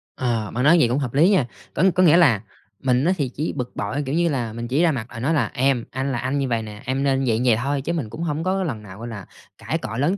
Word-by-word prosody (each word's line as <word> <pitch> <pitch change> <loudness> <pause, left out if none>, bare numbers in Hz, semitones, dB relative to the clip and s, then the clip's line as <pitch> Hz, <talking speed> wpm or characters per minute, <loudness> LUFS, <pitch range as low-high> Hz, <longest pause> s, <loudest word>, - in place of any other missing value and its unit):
Ờ, 115 -5 -1
bạn 125 - -1
nói 160 +5 +6
vậy 125 - +4
cũng 125 +4 0
hợp 130 -4 -3
lý 155 +7 +5
nha. 190 -11 +3 0.3
Có - - 0
có 185 - +4
nghĩa 170 -1 +6
là 130 - +4 0.4
mình 130 +1 +2
á 180 - +3
thì 140 -4 -1
chỉ 150 +5 -3
bực 125 -3 -5
bội, 130 +9 -2
kiểu 135 +3 -2
như 170 0 +2
là, 120 -7 -2
mình 115 +1 -5
chỉ 135 +6 +1
ra 170 -2 +4
mặt 120 -6 -4
là - - -7
nói 140 +8 0
là 130 -9 +1
em, 130 -2 +1
anh 135 +2 -2
là 120 - -1
anh 130 +4 -1
như 135 - 0
vầy 115 -2 0
nè, 105 0 -9
em 130 +2 -1
nên 135 -1 +1
vậy, 115 0 +1
vậy 120 -3 +5
thôi 140 +1 -1
chứ 165 +5 -2
mình 145 -10 -3
cũng 165 - -6
hông 155 -1 -2
có 190 +1 0
lần 120 -11 -4
nào, 95 -1 -11
gọi 115 - -6
là, 100 -5 -7 0.3
cãi - - -2
cọ 110 +2 -6
lớn 160 +9 +1
130 Hz, 305 wpm, -22 LUFS, 115-150 Hz, 0.4 s, nói